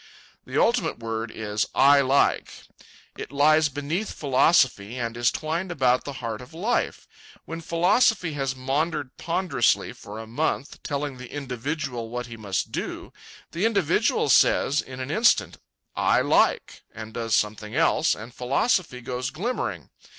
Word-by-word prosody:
The - - -1
ultimate 230 -9 +2
word 115 0 -4
is 105 -1 -2
I 140 +1 +6
LIKE. 135 +1 +2 0.7
It - - -6
lies 155 +2 +4
beneath 145 +9 -3
philosophy, 130 - +2
and 115 -2 -3
is 120 0 +2
twined 165 +4 -3
about 130 -5 +2
the 140 - -5
heart 110 -1 -4
of 135 +6 -13
life. 215 +9 -1 0.4
When 165 0 -6
philosophy 180 +2 +2
has 135 -2 -2
maundered 135 +1 -2
ponderously 165 -7 0
for 105 +1 -10
a 110 - -7
month, 140 +4 -2
telling 145 -2 -3
the 125 -1 -10
individual 135 -3 -4
what 125 +1 -4
he 115 -1 -9
must 100 -4 -3
do, - - -5 0.4
the 170 - -3
individual 200 -4 +1
says, 140 +2 +4
in 130 -1 -10
an 130 +2 -4
instant, 225 +5 +2 0.4
"I - - +3
LIKE," - - +1
and 110 0 -9
does 115 -2 0
something 105 0 -2
else, - - +3
and 115 +3 -10
philosophy 135 - 0
goes 125 +1 -3
glimmering. 215 - -4
135 Hz, 145 wpm, -25 LUFS, 120-160 Hz, 0.7 s, I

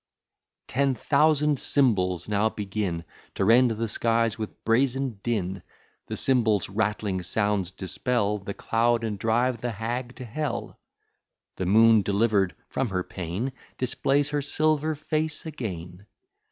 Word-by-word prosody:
Ten 135 0 +1
thousand 150 +2 +2
cymbals 95 - +2
now 105 +1 +2
begin, 95 -5 -3 0.3
To 95 - 0
rend 120 +4 +6
the 115 0 -2
skies 115 0 +1
with 110 -2 -7
brazen 125 0 +1
din; 95 -5 -2 0.5
The - - -4
cymbals' 110 -8 +2
rattling 100 -1 -1
sounds 100 0 +1
dispel 105 +3 -1
The 100 +1 -6
cloud, 115 +1 +1
and 105 -3 -3
drive 115 +2 +1
the 120 -1 -2
hag 120 +4 -4
to 130 - -8
hell. 150 +6 -4 0.8
The 95 - -2
moon, 110 +2 +6
deliver'd 100 -1 +1
from 135 - -2
her 90 -2 -1
pain, 95 +10 -4 0.3
Displays 135 +3 +1
her 145 -1 0
silver 155 +2 +1
face 155 +1 -2
again. 95 - -6
115 Hz, 130 wpm, -26 LUFS, 100-130 Hz, 0.8 s, rend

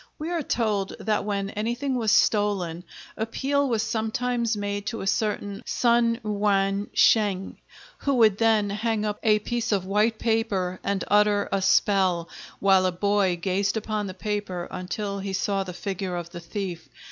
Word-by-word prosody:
We 315 +3 -4
are 340 -2 0
told 215 -7 -1
that 215 -2 0
when 200 -1 -2
anything 240 +6 -2
was 225 -4 +1
stolen 190 -7 +2 0.3
appeal 275 +5 0
was 225 -3 +1
sometimes 230 +1 -1
made 205 0 -3
to 230 - -3
a - - -4
certain 205 0 -1
Sun 235 -1 +2
Yuan 200 -1 +1
Sheng, 200 -4 +2 0.4
who 280 -1 0
would 220 -4 +4
then 220 -3 +3
hang 215 +1 -1
up 210 -1 -2
a 215 -1 +4
piece 230 +2 -2
of 195 -3 +1
white 210 +3 +1
paper 210 -6 0
and 200 -2 -1
utter 205 0 +3
a 195 - +1
spell, 185 -4 +2 0.3
while 190 -1 +4
a - - 0
boy 195 0 +1
gazed 195 +4 0
upon 215 -1 -2
the 185 - -7
paper 200 -3 -3
until 200 +2 -4
he 195 0 -4
saw 195 0 0
the 185 - -7
figure 190 0 -4
of 170 -1 -5
the 175 - -7
thief. 175 0 -6
205 Hz, 165 wpm, -25 LUFS, 195-220 Hz, 0.4 s, would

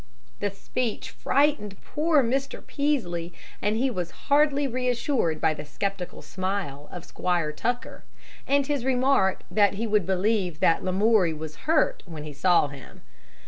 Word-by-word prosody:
The 205 - 0
speech 220 +4 -3
frightened 275 -9 +1
poor 305 -2 +2
Mr. 270 +4 -2
Peaslee, 180 - -1 0.3
and 210 +2 +1
he 260 +2 +1
was 180 -6 -3 0.2
hardly 290 0 +4
reassured 250 - 0
by 155 - +2
the 150 - -7
skeptical 195 +4 -4
smile 185 -7 -4
of 175 -1 -8
Squire 175 -4 -1
Tucker, 240 +10 -3 0.4
and 280 0 +3
his 285 -3 -1
remark 255 -6 +2
that 200 +1 +3
he 225 +4 -2
would 210 -5 +1
believe 190 -3 0
that 165 - +3
Lamoury 190 -2 +3
was 155 0 -7
hurt 320 -2 +3
when 160 -3 -7
he 150 -1 -7
saw 170 +1 +3
him. 140 -2 -12
205 Hz, 145 wpm, -26 LUFS, 175-260 Hz, 0.4 s, hardly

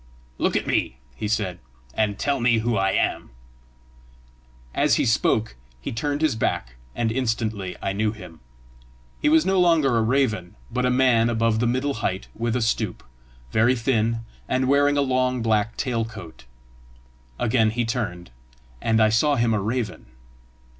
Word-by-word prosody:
"Look - - +1
at - - 0
me," 65 - 0 0.2
he 105 - -4
said, 100 -5 -1 0.3
"and 105 -2 0
tell 140 -1 0
me 120 -1 +3
who 115 +1 0
I 95 -1 +2
am." - - 0 1.4
As - - +3
he - - +1
spoke, 110 - +1 0.2
he - - -5
turned 145 +6 -2
his 150 -7 +2
back, - - -2 0.2
and 115 -2 0
instantly 110 -6 -2
I 95 - -1
knew 105 +1 0
him. 90 -7 -12 0.8
He - - +3
was 160 +1 +4
no 190 0 +2
longer 165 -8 +3
a 115 - +3
raven, 110 -7 0 0.2
but 125 0 0
a - - +2
man 125 -2 +3
above 115 -1 +1
the 120 - +1
middle 130 +4 0
height 95 +1 -2
with 115 +1 -2
a 125 - +1
stoop, 110 -3 -1 0.5
very 115 - +3
thin, 115 -2 0 0.3
and 130 0 +1
wearing 145 +1 +3
a - - +3
long 130 -2 0
black 110 -1 +1
tail 120 -5 -1
coat. 110 - -10 0.9
Again 110 -2 +2
he 120 +2 -1
turned, 105 - -4 0.5
and 110 0 +2
I 110 0 +5
saw 140 +7 +3
him 115 -3 +2
a 105 - 0
raven. 110 - -3
115 Hz, 165 wpm, -24 LUFS, 110-130 Hz, 1.4 s, I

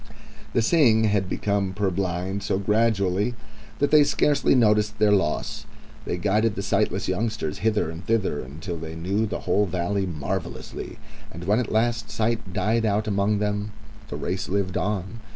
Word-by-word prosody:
The 115 - +2
seeing 115 -7 +4
had 100 -3 +1
become 100 -2 -1
purblind 95 -1 -1
so 95 - 0
gradually 105 +1 +1 0.4
that 145 - +1
they 150 -1 +7
scarcely 145 -1 +2
noted 105 -3 +4
their 105 0 +4
loss. 95 -7 0 0.4
They 90 - -2
guided 105 +3 +1
the 100 - -3
sightless 100 -1 0
youngsters 95 -4 -2
hither 105 -6 +1
and 80 +2 -8
thither 105 -10 +1
until 80 +7 -6
they 80 0 -7
knew 100 +7 0
the 105 - -4
whole 100 +3 +2
Valley 95 +3 -1
marvellously, 75 -5 -5 0.3
and 85 +3 -8
when 105 +5 +2
at 125 - -2
last 115 0 +1
sight 110 -1 -1
died 110 +6 +1
out 105 0 +1
among 100 0 +1
them 105 0 -2 0.3
the - - -6
race 95 +2 -3
lived 95 -1 -1
on. 105 +2 -2
100 Hz, 160 wpm, -25 LUFS, 95-110 Hz, 0.4 s, they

